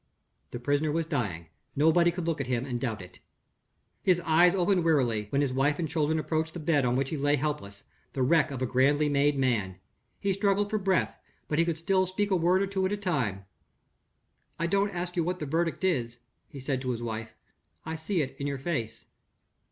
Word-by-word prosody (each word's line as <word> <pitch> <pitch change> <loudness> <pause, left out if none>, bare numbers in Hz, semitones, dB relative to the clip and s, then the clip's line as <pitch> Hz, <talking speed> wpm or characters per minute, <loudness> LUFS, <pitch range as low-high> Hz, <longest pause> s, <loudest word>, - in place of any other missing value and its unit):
The 120 - -6
prisoner 145 +4 0
was 165 +1 0
dying; 105 - -2 0.3
nobody 160 +4 +4
could 175 0 -4
look 165 -4 -1
at 135 - -4
him 125 0 -1
and 120 -3 -4
doubt 110 -6 -3
it. 90 - -14 0.8
His 180 -2 +3
eyes 175 +2 +4
opened 180 -1 +2
wearily, 120 -10 +2
when 140 +4 +1
his 135 -2 -1
wife 140 +3 +2
and 170 - -2
children 160 -1 0
approached 160 +1 -2
the - - -4
bed 150 -4 +2
on 120 0 +1
which 135 +1 -1
he 155 - -2
lay 145 +1 +2
helpless 135 -9 -4 0.3
the 135 - 0
wreck 155 +5 +3
of 130 -2 -4
a - - +2
grandly 140 +4 +2
made 145 0 +2
man. 115 -8 0 0.4
He 200 -1 0
struggled 200 +1 +1
for 215 - +1
breath, 190 -2 0 0.3
but 150 - 0
he 165 - +4
could 170 -2 -1
still 185 +3 +1
speak 205 +2 -1
a - - +4
word 180 +3 +3
or - - -1
two 195 -1 -1
at - - -5
a 205 - -1
time. 130 - -2 1.1
"I 170 - -1
don't 200 +3 +2
ask 180 -1 -4
you 170 - +1
what 180 +2 -2
the 155 - -4
verdict 165 +5 -1
is," 120 -10 0 0.3
he 140 - -9
said 135 0 -2
to 130 - -3
his 120 -1 -2
wife; 110 -1 -5 0.5
"I 160 +1 -3
see 160 +1 -1
it 130 - -7
in 140 - -2
your 140 -1 -2
face." 130 -6 -4
150 Hz, 215 wpm, -28 LUFS, 130-175 Hz, 1.1 s, nobody